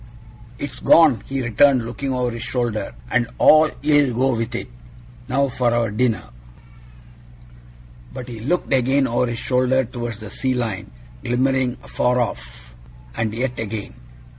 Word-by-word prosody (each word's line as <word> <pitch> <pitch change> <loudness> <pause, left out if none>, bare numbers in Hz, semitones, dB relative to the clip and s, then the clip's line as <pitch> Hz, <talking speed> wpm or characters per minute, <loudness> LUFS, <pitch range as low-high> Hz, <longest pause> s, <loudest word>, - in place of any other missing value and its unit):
'It's 135 -3 -6
gone!' 150 -10 +5
he 135 -1 -2
returned, 125 +1 +3
looking 125 +4 -4
over 125 -1 -1
his 115 -1 -6
shoulder. 115 - -2 0.2
'And 120 -1 +2
all 155 0 +6
ill 145 -4 +3
go 130 +1 +2
with 115 +1 -3
it. - - -4 0.6
Now 140 +2 +1
for 125 -2 0
our 115 -2 +1
dinner!' 115 +1 -1 1.8
But 125 - -8
he 120 -3 -8
looked 140 +7 -1
again 135 +2 +3
over 125 0 0
his 120 -1 -3
shoulder 130 +1 +1
towards 120 -2 -6
the 110 -2 -9
sea 130 -1 -1
line 110 -6 -3 0.3
glimmering 130 +1 0
afar 125 0 0
off, - - -5 0.4
and 110 -1 -1
yet 125 +1 -2
again. 110 -1 -5
125 Hz, 145 wpm, -21 LUFS, 115-130 Hz, 1.8 s, all